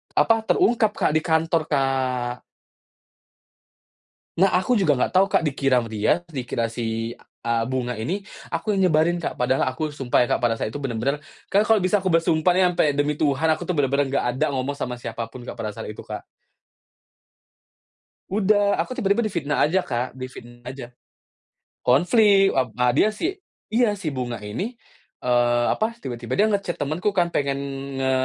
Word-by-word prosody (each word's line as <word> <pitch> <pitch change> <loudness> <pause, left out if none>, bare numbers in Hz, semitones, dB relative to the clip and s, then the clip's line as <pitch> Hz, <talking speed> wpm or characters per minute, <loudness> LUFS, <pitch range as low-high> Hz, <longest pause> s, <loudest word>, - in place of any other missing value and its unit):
apa, 225 -1 +3
terungkap, 220 -2 +3
Kak, - - +1
di 155 - +3
kantor, 160 0 +1
Kak. 130 -3 -1 2.0
Nah, 195 - +6
aku 185 +7 +1
juga 150 -7 +3
enggak - - 0
tahu, 190 +1 +5
Kak. 165 - +2
Dikira 135 -3 +1
sama 115 - -9
dia 110 +11 +1
dikira 125 -4 -2
si, 115 0 -3 0.3
eee, 115 -1 +1
Bunga 125 -1 -2
ini 185 - -3 0.2
aku 170 +6 -2
yang 190 -2 +3
nyebarin, 165 +2 +2
Kak. - - -4
Padahal 130 +1 +1
aku 150 +4 -3
sumpah 130 -3 +1
ya, - - -3
Kak, - - +1
pada 120 -2 +1
saat 110 - -3
itu 145 - -5
bener-bener 135 +2 -2 0.3
kan 200 - +5
kalau 225 - +6
bisa 195 +2 +2
aku 185 - -1
bersumpah 165 0 +3
nih 185 - +4
sampe - - +2
demi 145 +1 +1
Tuhan, 150 +1 +2
aku 155 - -4
tuh 180 - 0
bener-bener 140 0 +1
nggak 140 - 0
ada 130 +5 0
ngomong 130 +2 -1
sama 125 -3 -4
siapa 115 -1 -5
pun, 120 +1 -11
Kak, - - -6
pada 110 - -5
saat 115 - -6
itu, - - -10
Kak. - - -7 2.1
Udah. 205 0 +2
Aku 255 - -7
tiba-tiba 205 +1 +1
difitnah 170 -8 0
aja, 180 +5 +2
Kak. 125 -4 -3
Difitnah 120 -2 -10
aja. 125 -2 -8 0.9
Konflik. 195 - +4
Ep 130 -2 +1
a 125 0 +3
dia 205 - +4
si 335 - -2 0.4
iya. 230 -3 +3
Si 165 -6 -3
Bunga 125 -2 -3
ini, 190 - -4 0.5
eee, 120 -1 +2
apa, 225 +2 -1
tiba-tiba 120 - -5
dia 205 - +5
nge-chat 200 -4 -1
temenku 155 +8 -1
kan, 175 -2 +2
pengen 140 -1 0 0.4
nge 130 0 +1
145 Hz, 175 wpm, -23 LUFS, 125-185 Hz, 2.1 s, Nah